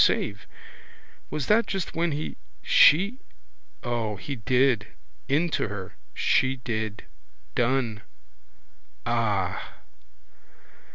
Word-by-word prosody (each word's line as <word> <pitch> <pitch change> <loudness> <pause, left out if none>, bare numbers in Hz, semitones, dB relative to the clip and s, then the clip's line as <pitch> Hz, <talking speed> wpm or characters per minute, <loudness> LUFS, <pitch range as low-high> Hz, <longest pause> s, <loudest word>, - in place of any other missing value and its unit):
Save. 100 0 0 0.8
Was 150 -3 -2
that 225 +2 +4
just 195 -3 -3
when 170 0 +1
he, 150 +2 -3 0.3
she? 200 - +6 0.6
O, 115 -3 -1
he 140 +7 -5
did. 125 -1 +2 0.4
Into 155 +1 +1
her. 100 -2 -6 0.2
She 130 0 +3
did. 110 -4 -4 0.5
Done. 120 - +1 1.0
Ah! 105 -5 -1
120 Hz, 90 wpm, -26 LUFS, 110-150 Hz, 1.0 s, she